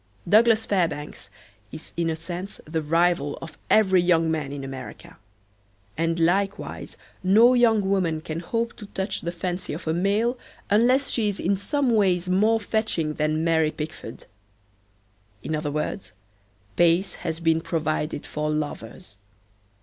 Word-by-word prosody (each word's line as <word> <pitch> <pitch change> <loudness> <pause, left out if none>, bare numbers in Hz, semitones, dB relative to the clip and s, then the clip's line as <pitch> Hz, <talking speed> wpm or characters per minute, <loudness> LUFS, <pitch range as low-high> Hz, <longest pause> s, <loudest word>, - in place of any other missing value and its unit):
Douglas 225 +3 +5
Fairbanks 160 - -2 0.4
is 160 - -10
in 170 -1 0
a 160 - -1
sense 175 +4 -7
the 160 +1 -2
rival 165 -1 +1
of 165 -2 -9
every 190 -4 +5
young 165 -2 +2
man 150 -3 -2
in 140 -1 -6
America. 135 -5 -9 0.8
And 165 +1 0
likewise 195 +4 -1 0.2
no 220 +7 +6
young 225 -5 +3
woman 180 -5 +1
can 155 +1 -5
hope 230 +7 -2
to 205 - -10
touch 190 +1 -3
the 170 - -3
fancy 180 -1 -4
of 160 - -7
a 160 - +1
male 210 +8 +1 0.3
unless 250 +6 +3
she 220 -3 +1
is 200 - -5
in 195 +3 +1
some 270 +6 0
ways 185 -4 +2
more 215 +4 +3
fetching 205 -8 -1
than 155 +1 0
Mary 160 -2 +3
Pickford. 150 -7 -7 1.2
In 155 - -2
other 150 -1 -2
words, 150 +6 -4 0.6
pace 175 +3 +3
has 160 -1 -3
been 165 -1 +2
provided 155 -3 -2
for 150 0 -3
lovers. 145 -9 -5
170 Hz, 145 wpm, -24 LUFS, 155-200 Hz, 1.2 s, no